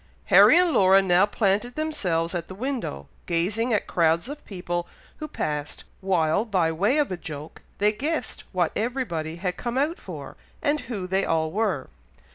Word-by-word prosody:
Harry - - +9
and 355 -1 +4
Laura 190 -6 +6
now 190 0 +4
planted 210 +3 0
themselves 185 - -1
at 170 -2 -3
the 185 - -9
window, 225 - -4 0.2
gazing 205 +8 0
at 210 - +1
crowds 165 +1 +1
of 290 +2 -8
people 175 -3 -4 0.3
who 305 - -5
passed, 150 - -4 0.2
while, 185 -1 +1
by 185 -8 +1
way 200 - +1
of 295 -8 +1
a 185 - -2
joke, 155 -3 -8 0.2
they 210 +1 +3
guessed 300 +9 -3
what 180 -3 +1
everybody 205 -10 -2
had 180 +1 -3
come 240 +1 -3
out 300 +5 0
for, - - -8 0.2
and 300 0 +1
who 200 -6 -3
they 190 +1 0
all 160 -1 0
were. 195 -9 -1
195 Hz, 170 wpm, -25 LUFS, 170-240 Hz, 0.3 s, Harry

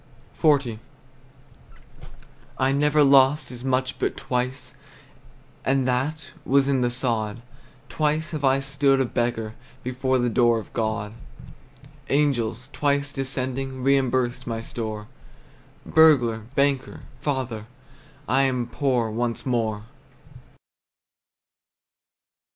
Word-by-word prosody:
XL. 140 -7 +3 1.8
I 130 +1 +2
never 150 +2 +3
lost 135 +1 +4
as 125 0 -8
much 130 0 -1
but - - -1
twice, 125 +1 -3 0.9
And 135 -1 +1
that 145 +3 -1
was 140 0 +3
in 135 -2 +2
the 120 - +2
sod; 115 -2 -2 0.4
Twice 155 +1 -1
have 155 -3 -4
I 135 0 +3
stood 135 0 +2
a 135 - +2
beggar 120 -2 -2 0.3
Before 130 +1 0
the 120 -1 +1
door 120 0 +3
of 110 - -8
God! 110 -2 -2 1.0
Angels, 130 -4 0
twice 140 -1 0
descending, 130 -1 -3
Reimbursed 130 -3 +1
my 115 -1 -2
store. 110 -4 -5 0.8
Burglar, 120 -9 +4
banker, 140 -1 0 0.2
father, 130 -7 -3 0.6
I 135 +1 +3
am 130 -3 +1
poor 125 -5 0
once 115 +1 -2
more! 110 -5 -1
130 Hz, 105 wpm, -24 LUFS, 120-140 Hz, 1.8 s, lost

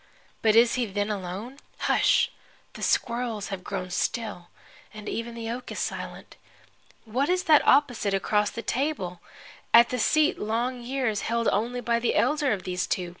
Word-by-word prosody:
But 220 -1 +4
is 235 +1 +6
he 245 -2 0
then 205 +1 -2
alone? 205 +7 -5 0.2
Hush! - - +3 0.4
The - - -10
squirrels 235 -3 -1
have 195 -2 -5
grown 185 -2 -4
still, 195 -2 -2 0.5
and 215 0 -9
even 230 0 -4
the 230 -1 -4
oak 245 +1 -6
is - - -6
silent. - - -5 0.7
What 255 +7 0
is 365 0 +1
that 305 -2 +6
opposite, 245 -8 +3
across 210 +2 +1
the 230 - -7
table, 245 - -2 0.6
at 235 0 +8
the 250 - -2
seat 310 +8 +3
long 240 +4 -1
years 245 -4 -1
held 230 0 0
only 240 +4 -1
by 235 0 +1
the 235 - 0
elder 295 -2 +2
of 195 -4 -2
these 180 +1 -2
two? 180 -2 -2
230 Hz, 170 wpm, -26 LUFS, 205-250 Hz, 0.7 s, at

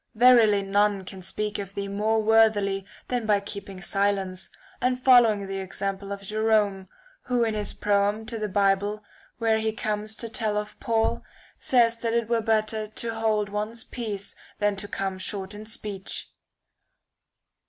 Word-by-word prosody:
Verily 225 -4 +6
none 200 0 +2
can 190 0 -9
speak 210 +3 -3
of 195 -1 -7
thee 200 0 -3
more 215 +2 +1
worthily 210 -3 +3 0.2
than 245 -3 -2
by 205 -1 +4
keeping 200 -1 -7
silence, 195 -2 0 0.3
and 250 +1 +1
following 240 -6 +5
the 195 0 -4
example 195 +1 -4
of 200 0 -5
Jerome, 210 -2 +1 0.4
who 245 -1 +1
in 225 -1 0
his 210 -1 0
proem 205 +1 +1
to 225 0 -5
the 215 - -1
Bible, 200 +2 +1 0.3
where 225 -1 +2
he 220 0 0
comes 215 0 -2
to 230 - -4
tell 220 -2 -1
of 210 0 -5
Paul, 225 -1 0 0.4
says 235 -2 +3
that 230 0 -2
it 235 -2 +1
were 235 -1 +2
better 215 0 0
to 225 +2 -4
hold 215 -2 0
one's 215 +3 -3
peace 210 -5 -5 0.2
than 205 -1 +1
to 205 +1 -4
come 195 -1 -3
short 195 +1 -3
in 210 +1 -9
speech. 210 -3 -6
210 Hz, 160 wpm, -26 LUFS, 200-225 Hz, 0.4 s, Verily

